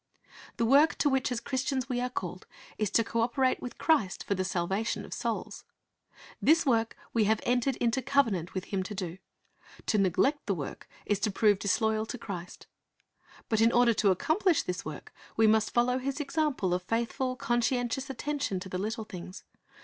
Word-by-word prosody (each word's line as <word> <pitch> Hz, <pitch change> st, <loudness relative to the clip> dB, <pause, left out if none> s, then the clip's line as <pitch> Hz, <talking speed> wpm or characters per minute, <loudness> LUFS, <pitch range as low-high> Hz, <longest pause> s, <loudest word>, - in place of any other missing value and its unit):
The 230 Hz, -, +1 dB
work 280 Hz, +6 st, +5 dB
to 290 Hz, -, +3 dB
which 265 Hz, -2 st, +1 dB
as 245 Hz, -, -1 dB
Christians 260 Hz, 0 st, -2 dB
we 245 Hz, -2 st, -1 dB
are 250 Hz, -, -1 dB
called 185 Hz, -6 st, -5 dB, 0.3 s
is 215 Hz, -2 st, +1 dB
to 230 Hz, -, +3 dB
co 230 Hz, +1 st, -1 dB
operate 255 Hz, +3 st, +1 dB
with 250 Hz, -, -7 dB
Christ 285 Hz, -, +1 dB
for -, -, -1 dB
the 185 Hz, -1 st, -1 dB
salvation 190 Hz, +4 st, -1 dB
of -, -, -8 dB
souls. -, -, -3 dB, 0.8 s
This 325 Hz, +2 st, +4 dB
work 230 Hz, -4 st, +1 dB, 0.2 s
we 225 Hz, -2 st, +3 dB
have 215 Hz, +1 st, +2 dB
entered 245 Hz, +2 st, +1 dB
into 240 Hz, +2 st, 0 dB
covenant 230 Hz, -, +1 dB
with 185 Hz, -, -2 dB
Him 195 Hz, -, +1 dB
to 195 Hz, +3 st, -5 dB
do. 185 Hz, -2 st, -5 dB, 0.7 s
To 215 Hz, -, +2 dB
neglect 260 Hz, -, +2 dB
the 200 Hz, -, +1 dB
work 145 Hz, -5 st, -7 dB, 0.2 s
is 205 Hz, -2 st, 0 dB
to 205 Hz, -, +1 dB
prove 205 Hz, 0 st, +3 dB
disloyal 220 Hz, +2 st, +1 dB
to 250 Hz, -, -5 dB
Christ. 180 Hz, -6 st, -7 dB, 0.8 s
But 220 Hz, -1 st, +1 dB
in 230 Hz, +1 st, +5 dB
order 240 Hz, -1 st, +4 dB
to 205 Hz, -2 st, +2 dB
accomplish 320 Hz, -, +2 dB
this 180 Hz, +2 st, -4 dB
work, 155 Hz, -4 st, -8 dB, 0.2 s
we 225 Hz, -, +5 dB
must 220 Hz, 0 st, +4 dB
follow 250 Hz, +2 st, +2 dB
His 275 Hz, +2 st, -3 dB
example 290 Hz, -, 0 dB
of 180 Hz, -, 0 dB
faithful, 235 Hz, +6 st, -1 dB
conscientious 245 Hz, +2 st, 0 dB
attention 280 Hz, -6 st, -2 dB
to 190 Hz, -, -7 dB
the 185 Hz, -, -3 dB
little 220 Hz, +3 st, -3 dB
things. 185 Hz, -2 st, -9 dB
230 Hz, 185 wpm, -29 LUFS, 195-260 Hz, 0.8 s, work